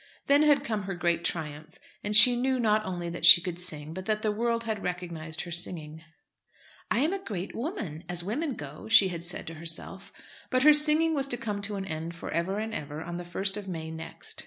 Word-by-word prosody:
Then 285 Hz, +1 st, +4 dB
had 300 Hz, -2 st, +4 dB
come 215 Hz, -4 st, -3 dB
her 195 Hz, -1 st, -4 dB
great 170 Hz, -1 st, 0 dB
triumph, 155 Hz, -1 st, -5 dB, 0.3 s
and 210 Hz, +1 st, -1 dB
she 245 Hz, +2 st, +10 dB
knew 260 Hz, +1 st, 0 dB
not 215 Hz, -2 st, +2 dB
only 175 Hz, -2 st, -4 dB
that 170 Hz, -, -8 dB
she -, -, +10 dB
could 175 Hz, 0 st, -6 dB
sing, 155 Hz, -3 st, -1 dB
but 185 Hz, +2 st, -7 dB
that 215 Hz, -1 st, -1 dB
the 215 Hz, -, +1 dB
world 230 Hz, +2 st, -1 dB
had 220 Hz, -3 st, -4 dB
recognised 170 Hz, -3 st, -4 dB
her 175 Hz, -, -8 dB
singing. 160 Hz, -2 st, -4 dB, 0.9 s
"I -, -, 0 dB
am 315 Hz, +6 st, +1 dB
a 390 Hz, -1 st, -5 dB
great 195 Hz, -, -6 dB
woman, 230 Hz, -, -5 dB
as 175 Hz, -1 st, -1 dB
women 260 Hz, -, -3 dB
go," 145 Hz, +6 st, -10 dB
she 205 Hz, -4 st, +6 dB
had 170 Hz, -2 st, -6 dB
said 175 Hz, +1 st, -4 dB
to 165 Hz, -, -7 dB
herself. 165 Hz, +4 st, -6 dB, 0.4 s
But 255 Hz, 0 st, +1 dB
her 305 Hz, +1 st, +8 dB
singing 305 Hz, +2 st, +3 dB
was 275 Hz, -2 st, +2 dB
to 245 Hz, -, -1 dB
come 210 Hz, -3 st, -4 dB
to 205 Hz, +1 st, -2 dB
an 195 Hz, -1 st, -5 dB
end 165 Hz, 0 st, -6 dB
for -, -, -8 dB
ever 170 Hz, +5 st, -2 dB
and 220 Hz, +1 st, -4 dB
ever 150 Hz, -4 st, -6 dB
on 175 Hz, +1 st, -6 dB
the 175 Hz, -, -6 dB
1st 195 Hz, +3 st, -1 dB
of 205 Hz, -2 st, -8 dB
May 160 Hz, -3 st, -6 dB
next. 160 Hz, 0 st, -8 dB
190 Hz, 230 wpm, -27 LUFS, 170-230 Hz, 0.9 s, she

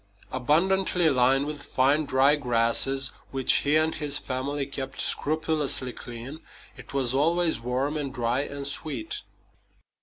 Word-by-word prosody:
Abundantly 170 Hz, +5 st, +2 dB
lined 135 Hz, +2 st, +2 dB
with 150 Hz, -1 st, -6 dB
fine, 145 Hz, +4 st, +1 dB
dry 135 Hz, +2 st, +3 dB
grasses, 125 Hz, 0 st, +2 dB, 0.2 s
which 135 Hz, -1 st, +4 dB
he 145 Hz, +1 st, +1 dB
and 155 Hz, +1 st, +1 dB
his 145 Hz, -2 st, +3 dB
family 140 Hz, +1 st, -3 dB
kept 135 Hz, 0 st, -5 dB
scrupulously 150 Hz, -4 st, 0 dB
clean, 120 Hz, +7 st, -9 dB, 0.4 s
it -, -, -12 dB
was 135 Hz, -3 st, +1 dB
always 160 Hz, 0 st, +1 dB
warm 130 Hz, +5 st, -2 dB
and 140 Hz, -3 st, -4 dB
dry 120 Hz, -1 st, -1 dB
and 140 Hz, -1 st, -6 dB
sweet. 140 Hz, -5 st, -4 dB
140 Hz, 130 wpm, -25 LUFS, 130-150 Hz, 0.4 s, which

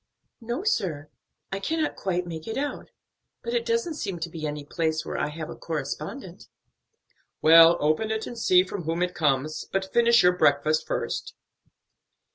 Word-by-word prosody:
"No, 240 Hz, +9 st, -4 dB
sir; 165 Hz, -, -1 dB, 0.4 s
I 195 Hz, -, -2 dB
cannot 315 Hz, +9 st, -1 dB
quite 180 Hz, -2 st, -2 dB
make 160 Hz, -2 st, -7 dB
it 225 Hz, -, -4 dB
out, 290 Hz, +1 st, -4 dB, 0.5 s
but 470 Hz, -, -4 dB
it 475 Hz, -1 st, -1 dB
doesn't 460 Hz, -8 st, 0 dB
seem 200 Hz, -, -4 dB
to 170 Hz, 0 st, -4 dB
be 155 Hz, -2 st, -4 dB
any 150 Hz, -1 st, -5 dB
place 160 Hz, 0 st, -1 dB
where -, -, -5 dB
I -, -, 0 dB
have 155 Hz, +1 st, -6 dB
a -, -, -8 dB
correspondent." 165 Hz, -, -6 dB, 0.9 s
"Well, 165 Hz, +1 st, +8 dB
open 155 Hz, +9 st, +1 dB
it 220 Hz, 0 st, -2 dB
and 240 Hz, -, -7 dB
see 185 Hz, -5 st, +4 dB
from 185 Hz, -2 st, -6 dB
whom 165 Hz, +2 st, 0 dB
it 180 Hz, 0 st, -2 dB
comes. 150 Hz, -1 st, 0 dB
But 190 Hz, 0 st, -2 dB
finish 235 Hz, -1 st, +5 dB
your 180 Hz, 0 st, +4 dB
breakfast 155 Hz, -1 st, +2 dB
first." -, -, -3 dB
180 Hz, 170 wpm, -26 LUFS, 155-225 Hz, 0.9 s, Well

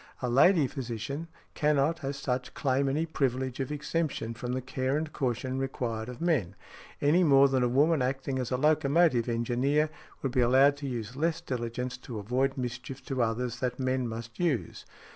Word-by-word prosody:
A 125 Hz, -, 0 dB
lady 155 Hz, +5 st, +5 dB
physician 130 Hz, +4 st, -5 dB, 0.3 s
cannot 150 Hz, +2 st, +1 dB
as 140 Hz, +1 st, -3 dB
such 125 Hz, -2 st, -3 dB
claim 135 Hz, -1 st, +1 dB
any 155 Hz, +4 st, 0 dB
privilege 130 Hz, -4 st, -1 dB
of 135 Hz, +1 st, -2 dB
exemption 150 Hz, -5 st, -2 dB
from 120 Hz, +2 st, -4 dB
the 130 Hz, -, -1 dB
care 130 Hz, +2 st, -1 dB
and 155 Hz, 0 st, -4 dB
caution 130 Hz, 0 st, -2 dB
required 120 Hz, -4 st, -3 dB
of 125 Hz, -, -8 dB
men, 145 Hz, -, 0 dB, 0.5 s
any 155 Hz, +6 st, +4 dB
more 140 Hz, -3 st, +6 dB
than 135 Hz, -1 st, +1 dB
a 125 Hz, -, +2 dB
woman 145 Hz, +4 st, +3 dB
acting 135 Hz, +1 st, -1 dB
as 125 Hz, -2 st, -2 dB
a 125 Hz, -, 0 dB
locomotive 150 Hz, -3 st, +3 dB
engineer 125 Hz, +6 st, +1 dB, 0.3 s
could 135 Hz, -, -2 dB
be 130 Hz, 0 st, +2 dB
allowed 135 Hz, +4 st, +5 dB
to 140 Hz, -1 st, -5 dB
use 120 Hz, -2 st, -4 dB
less 160 Hz, +3 st, 0 dB
diligence 125 Hz, 0 st, -4 dB
to 120 Hz, -3 st, -7 dB
avoid 130 Hz, +6 st, 0 dB
mischief 125 Hz, +1 st, -5 dB
to 130 Hz, -2 st, -1 dB
others 120 Hz, +1 st, -1 dB
than 125 Hz, -1 st, -1 dB
men 130 Hz, -1 st, 0 dB
must 115 Hz, 0 st, -7 dB
use. 140 Hz, -, -1 dB
130 Hz, 180 wpm, -29 LUFS, 125-145 Hz, 0.5 s, more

